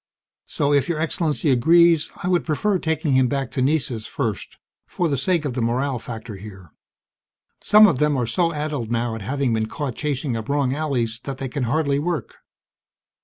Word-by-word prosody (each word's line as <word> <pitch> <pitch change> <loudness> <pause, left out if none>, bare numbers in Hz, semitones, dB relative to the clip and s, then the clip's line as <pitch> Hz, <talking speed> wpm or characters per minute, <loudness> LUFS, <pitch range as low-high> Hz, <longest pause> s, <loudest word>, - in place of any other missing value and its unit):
"... - - -71
so 145 0 0
if 140 +3 +2
Your 165 -3 -1
Excellency 155 -2 0
agrees, 165 +5 +4
I - - -1
would 180 -1 +2
prefer 185 +5 0
taking 160 -2 -1
him 130 -1 +4
back 135 0 -2
to 130 - -2
Nessus 130 -5 0
first, 115 -8 -4 0.3
for 175 - -1
the 145 - 0
sake 160 +4 0
of 140 - -2
the 125 - -2
morale 125 +3 0
factor 110 -2 -8
here. 95 -4 -12 0.9
Some 215 +1 +7
of 165 -11 +2
them 150 -2 +2
are 125 - 0
so 165 +9 0
addled 150 -6 -3
now 120 0 -1
at 110 - -6
having 130 +3 -1
been 110 -1 0
caught 130 +3 -4
chasing 140 -3 -2
up 110 +2 -5
wrong 140 -2 +1
alleys 125 -7 -1
that 135 -2 -5
they 135 - -4
can 130 0 -2
hardly 140 +2 +1
work." 170 +1 -3
140 Hz, 195 wpm, -22 LUFS, 120-155 Hz, 0.9 s, Some